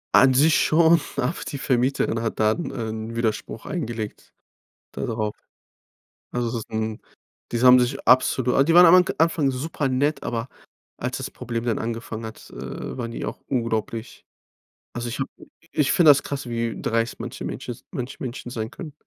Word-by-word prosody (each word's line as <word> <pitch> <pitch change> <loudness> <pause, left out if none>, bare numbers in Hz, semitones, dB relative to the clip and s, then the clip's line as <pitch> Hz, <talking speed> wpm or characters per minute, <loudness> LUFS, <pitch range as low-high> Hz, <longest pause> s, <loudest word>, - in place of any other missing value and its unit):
An 130 0 +7
sich 150 +4 +5
schon, 165 +1 +5 0.2
aber 140 +8 0
die 140 - -4
Vermieterin 130 -3 +1
hat 115 -1 -3
dann 110 +10 +1
ein 110 -1 -5
Widerspruch 115 -1 -2
eingelegt, 115 - -5 0.6
da - - -4
drauf. 110 -2 -2 1.0
Also 120 -1 -1
das 115 - -3
ist - - -11
'n 110 -1 -3 0.5
diese 120 +2 +2
haben 125 0 +9
sich 125 +2 -1
absolu 125 0 +4
aber 135 - +5
die 165 - +2
waren 175 +1 +9
am 180 +2 +8
k - - -2
am 160 - +7
Anfang 160 -4 +1
super 145 +2 -2
nett, 140 +4 0
aber 115 +1 -3 0.5
als 125 +1 -3
das 135 - -5
Problem 115 -2 -4
dann 115 -2 0
angefangen 115 -1 -4
hat, 110 0 -9
äh, - - -7
waren 120 -2 -4
die 115 - -5
auch - - -5
unglaublich 115 -2 -2 0.7
also, 120 0 -4
ich 120 - -5
habe 135 - -2
i - - -14 0.2
ich 145 -3 +2
finde 170 -3 +6
das 140 - +3
krass, 135 -3 -5
wie 115 -1 -2
dreist 115 0 -1
manche - - -6
Menschen - - -5
s - - -17
manche 125 +2 -5
Menschen 125 -1 -5
sein 115 -1 -4
können. 150 +4 -8
125 Hz, 185 wpm, -24 LUFS, 115-140 Hz, 1.0 s, haben